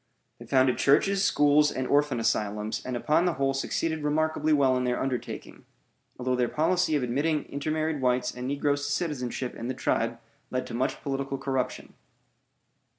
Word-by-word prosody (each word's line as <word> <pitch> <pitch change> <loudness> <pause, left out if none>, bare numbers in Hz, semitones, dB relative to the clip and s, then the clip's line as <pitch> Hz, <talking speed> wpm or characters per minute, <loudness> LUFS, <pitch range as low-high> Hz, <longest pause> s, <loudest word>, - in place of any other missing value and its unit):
They - - -11
founded 130 -1 +3
churches, 195 +8 +3
schools, 150 -4 +4
and 130 - -3
orphan 145 -2 +2
asylums, 105 -1 -1
and 125 -1 -3
upon 155 +7 +2
the 175 - +2
whole 135 -1 0
succeeded 160 +3 -1
remarkably 155 +1 +1
well 135 -3 +4
in 125 - 0
their 125 -1 0
undertaking, 130 -3 -4 0.5
although 125 0 0
their 125 -1 +1
policy 165 +1 +1
of 145 - +1
admitting 145 +5 0
intermarried 155 +1 -2
whites 125 -1 +1
and 125 0 -5
negroes 145 +1 0
to - - -2
citizenship 135 -6 -2
in 115 - -6
the 130 - -3
tribe 115 -2 0 0.3
led 130 0 -2
to - - -8
much 120 +2 -2
political 135 0 -2
corruption. 130 -1 -3
135 Hz, 165 wpm, -27 LUFS, 125-150 Hz, 0.5 s, schools